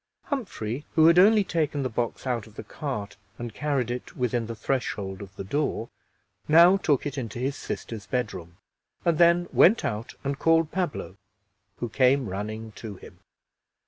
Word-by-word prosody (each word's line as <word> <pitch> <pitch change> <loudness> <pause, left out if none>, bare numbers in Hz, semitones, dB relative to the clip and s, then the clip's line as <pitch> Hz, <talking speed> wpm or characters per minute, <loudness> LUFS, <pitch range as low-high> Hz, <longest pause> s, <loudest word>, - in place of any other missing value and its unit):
Humphrey, 145 - -4
who 160 - +6
had 170 +2 +7
only 210 +2 +6
taken 155 -6 -1
the - - 0
box 120 +1 -3
out 120 -4 -2
of 110 - -18
the - - -7
cart 110 -9 -5 0.2
and 120 -2 -6
carried 135 -4 -1
it 125 - -6
within 120 -2 0
the 115 - -5
threshold 105 -6 -2
of 100 -1 -10
the 100 - -6
door, 120 +1 -2 0.6
now 170 +4 +7
took 150 -8 +1
it 145 -1 -3
into 115 -3 -6
his 135 +3 -1
sisters' 110 -3 -6
bedroom, 90 -9 -3 0.5
and 170 -3 +2
then 170 0 +5
went 220 +6 +5
out 110 +1 -4
and 140 0 -2
called 165 -1 +3
Pablo, 175 - -3 0.6
who 120 - -4
came 130 0 +2
running 110 +3 -5
to 110 -3 -7
him. - - -14
125 Hz, 170 wpm, -26 LUFS, 110-155 Hz, 0.6 s, had